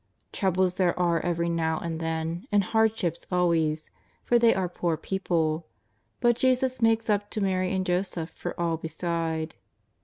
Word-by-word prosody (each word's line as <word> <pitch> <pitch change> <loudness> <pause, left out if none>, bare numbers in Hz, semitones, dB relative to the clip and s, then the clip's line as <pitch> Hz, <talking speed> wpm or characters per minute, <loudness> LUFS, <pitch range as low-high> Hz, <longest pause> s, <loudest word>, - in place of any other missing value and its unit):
Troubles 185 -2 +1
there 180 -1 +1
are 170 -2 +2
every 170 0 -1
now 165 -1 0
and 165 -1 -4
then, 165 +5 -3
and 205 -1 +4
hardships 220 -5 0
always, 165 -3 +1 0.3
for 240 - +3
they 230 -1 +6
are 190 -1 0
poor 170 -2 -1
people. 165 -3 -1 0.5
But 240 -1 +4
Jesus 255 0 +1
makes 225 0 +3
up 205 -1 +1
to 215 - -3
Mary 185 -2 0
and 190 -1 0
Joseph 180 -2 -1
for - - -6
all 170 -1 0
beside. 160 0 -3
175 Hz, 155 wpm, -27 LUFS, 165-200 Hz, 0.5 s, they